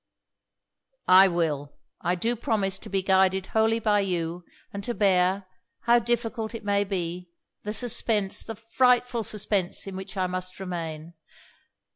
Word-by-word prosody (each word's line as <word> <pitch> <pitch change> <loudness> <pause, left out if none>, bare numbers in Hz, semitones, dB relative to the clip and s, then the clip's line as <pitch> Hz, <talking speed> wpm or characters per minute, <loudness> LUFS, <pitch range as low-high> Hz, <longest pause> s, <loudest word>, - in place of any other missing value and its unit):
'I 190 +1 +8
will, 155 -5 -2 0.2
I 175 - +1
do 230 +7 -1
promise 210 -5 -1
to - - -10
be 195 -1 -1
guided 190 0 +3
wholly 220 +1 +3
by 210 -2 +2
you; 175 -3 -2 0.3
and 200 0 -5
to 240 +3 -3
bear, 190 -1 +2 0.4
however 235 0 +3
difficult 235 -1 -2
it 225 - -7
may 200 0 +2
be, 180 -2 -4 0.4
the 210 - -2
suspense, 220 -3 0
the 225 - -6
frightful 245 +1 +2
suspense 205 -4 0
in 195 -1 -7
which 190 +2 -8
I 185 - +1
must 185 0 -4
remain. 165 -3 -5
195 Hz, 145 wpm, -26 LUFS, 180-225 Hz, 0.4 s, I